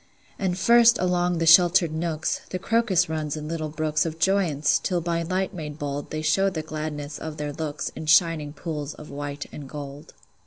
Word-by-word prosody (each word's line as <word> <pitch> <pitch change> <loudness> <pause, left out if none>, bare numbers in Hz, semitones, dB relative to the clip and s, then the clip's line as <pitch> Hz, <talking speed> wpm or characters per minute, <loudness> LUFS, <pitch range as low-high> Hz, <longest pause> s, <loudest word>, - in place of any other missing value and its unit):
And 185 -2 -1
first, 235 +2 +6
along 180 -1 +1
the 165 - 0
sheltered 175 0 +6
nooks, 160 -1 -2
The 185 - -3
crocus 195 -3 +2
runs 155 -1 -3
in 150 0 -6
little 155 -1 -3
brooks 155 0 0
Of 160 -1 -4
joyance, 175 -5 +2
till 180 -2 0
by 170 0 -1
light 185 +3 -2
made 150 -4 -6
bold 145 -1 -4
They 155 0 -4
show 195 +5 +3
the 160 -5 -4
gladness 150 -1 -5
of 155 -1 -6
their 150 -1 -4
looks 155 -1 -4
In 155 - -9
shining 160 -2 +3
pools 150 -2 -5
of 150 - -11
white 145 0 -5
and 140 -3 -9
gold. 145 +1 -9
160 Hz, 190 wpm, -25 LUFS, 150-180 Hz, -, first